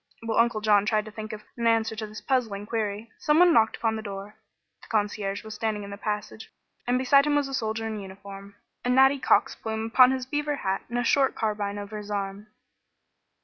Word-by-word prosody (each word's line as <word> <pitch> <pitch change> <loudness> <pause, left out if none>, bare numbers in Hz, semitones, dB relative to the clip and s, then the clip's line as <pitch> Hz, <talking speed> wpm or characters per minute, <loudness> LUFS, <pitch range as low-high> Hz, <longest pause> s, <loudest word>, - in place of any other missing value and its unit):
While 225 0 0
Uncle 230 -2 +2
John 210 -1 +3
tried 215 -1 +1
to 215 - -9
think 215 +1 -7
of 215 -1 -8
an 235 -1 0
answer 225 -1 +2
to 215 0 -5
this 215 +1 -9
puzzling 225 -7 -1
query 215 0 -3
someone 335 +3 +5
knocked 220 -5 +3
upon 225 -1 0
the - - -5
door. 200 0 -7 0.5
The - - -15
concierge 205 -2 -1
was 220 -1 -8
standing 215 -1 -2
in 200 - -8
the - - -5
passage 210 +1 -5 0.4
and 245 +1 +2
beside 275 +3 +4
him 295 - +2
was 290 -1 +1
a 270 - -7
soldier 225 -3 -2
in 220 -1 -4
uniform, 195 +1 -10 0.3
a 245 - -1
natty 265 +2 +5
cock's - - +3
plume 220 0 -4
upon 250 +3 +6
his 260 -1 -1
beaver 295 +2 -1
hat 195 -8 -2
and 240 - -3
a 245 - +1
short 270 +2 +2
carbine 205 -2 -2
over 205 +1 -6
his 210 0 -9
arm. 200 0 -4
220 Hz, 215 wpm, -26 LUFS, 205-245 Hz, 0.5 s, upon